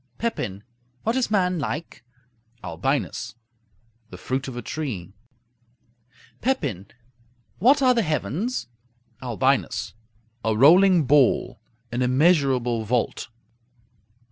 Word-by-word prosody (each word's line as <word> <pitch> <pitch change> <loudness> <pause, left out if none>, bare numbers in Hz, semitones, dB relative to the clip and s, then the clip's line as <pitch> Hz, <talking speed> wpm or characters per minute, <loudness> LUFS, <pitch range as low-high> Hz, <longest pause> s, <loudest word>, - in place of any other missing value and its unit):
Pepin 105 - -3 0.4
What 225 +2 0
is 260 -2 0
man 185 -4 +1
like? 145 -1 -5 0.6
Albinus 110 - -2 0.7
The 90 - -10
fruit 130 +8 -3
of 125 -2 -7
a 120 - -5
tree. 110 - -5 1.3
Pepin 140 - -1 0.7
What 270 - +4
are 255 -1 +5
the 235 - +2
heavens? 160 - -2 0.6
Albinus 120 -6 0 0.5
A 110 -1 0
rolling 175 - +6
ball; 140 -1 +2 0.3
an 120 +1 -2
immeasurable 130 -4 +2
vault. 115 +2 -1
135 Hz, 95 wpm, -24 LUFS, 115-180 Hz, 1.3 s, rolling